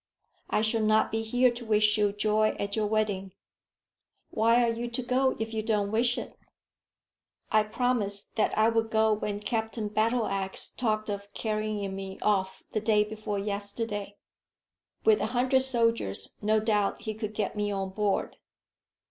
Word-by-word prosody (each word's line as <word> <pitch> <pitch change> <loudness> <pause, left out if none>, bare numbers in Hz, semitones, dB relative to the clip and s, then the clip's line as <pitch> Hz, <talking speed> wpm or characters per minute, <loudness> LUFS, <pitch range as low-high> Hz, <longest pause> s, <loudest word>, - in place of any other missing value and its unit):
I 210 - +1
shall 220 0 +1
not 215 0 +3
be 225 - 0
here 245 +3 +3
to 240 0 -8
wish 215 -1 +3
you 210 -2 +2
joy 215 +1 +1
at 200 0 -2
your 215 -1 0
wedding." 205 -3 -1 1.0
"Why 230 +2 +4
are 230 -1 +2
you 240 +1 -4
to 240 +2 -3
go 260 +2 +1
if 225 0 -4
you 220 - -1
don't 210 -2 0
wish 240 +2 +2
it?" - - -6 1.2
"I 215 - +5
promised 215 -2 -1
that 220 - +1
I 215 +1 +5
would 225 -1 +1
go 220 0 +3
when 205 -1 -3
Captain 220 0 -2
Battleax 215 -3 0
talked 215 -3 -1
of 200 -1 -5
carrying 215 -3 -2
me 195 0 -6
off 190 -2 0
the 215 - -1
day 215 -1 +3
before 210 -1 -4
yesterday. 205 0 -4 0.9
With 435 -1 +5
a - - 0
hundred 260 +1 +3
soldiers, 230 - +1
no 215 +1 +3
doubt 210 -2 0
he 220 -1 -3
could 215 0 -5
get 210 0 -2
me 205 0 -1
on 195 -1 -3
board." 205 0 -1
215 Hz, 165 wpm, -28 LUFS, 205-225 Hz, 1.2 s, I